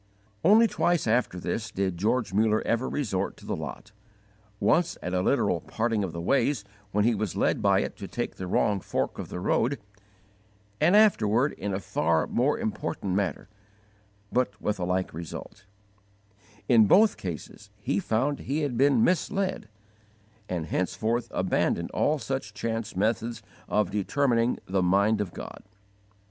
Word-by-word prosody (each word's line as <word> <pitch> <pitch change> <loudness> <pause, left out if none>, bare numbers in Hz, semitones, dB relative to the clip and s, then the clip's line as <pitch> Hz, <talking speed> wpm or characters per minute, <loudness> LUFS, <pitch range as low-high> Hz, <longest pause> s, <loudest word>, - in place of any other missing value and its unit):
Only 215 +5 +7
twice 175 -5 +1
after 115 -5 +1
this 110 +5 -3
did 95 -3 -1
George 105 +4 0
Muller 110 +1 +2
ever 115 +3 0
resort 100 -9 -2
to - - -15
the - - -2
lot: 110 - -7 0.7
once 175 0 +2
at 90 - -3
a 90 - +2
literal - - +1
parting 115 -2 -1
of 95 - -3
the 85 - -6
ways 120 +4 +1 0.3
when 105 +1 +2
he 120 - +4
was 105 -2 -2
led - - +1
by - - +4
it - - -4
to - - -7
take - - -4
the 95 - -5
wrong 100 +2 +1
fork - - -3
of - - -6
the - - -5
road, 120 +8 +1 1.0
and 170 +6 +4
afterward 135 - +4
in 100 +1 -4
a 95 - -1
far 80 -4 +1
more 135 - +1
important 215 - -3
matter, 95 0 -1 0.8
but 125 -4 0
with 105 -2 -2
a 90 - -1
like 90 +1 -1
result: 85 +4 -8 1.0
in 115 -4 +6
both 210 - +5
cases 90 +4 -7
he 100 -1 -1
found 130 +8 0
he 145 +4 -2
had 140 -5 -1
been 135 -4 +4
misled, 185 - 0 0.8
and 85 -3 -2
henceforth 110 +8 -1
abandoned 85 0 0
all 155 - +1
such 135 -7 -4
chance 115 -1 -3
methods 110 +2 -1 0.3
of 105 -3 +1
determining 120 +3 +1
the 95 0 0
mind 100 +4 +3
of 95 -4 -3
God. - - -9
110 Hz, 155 wpm, -27 LUFS, 95-130 Hz, 1.0 s, Only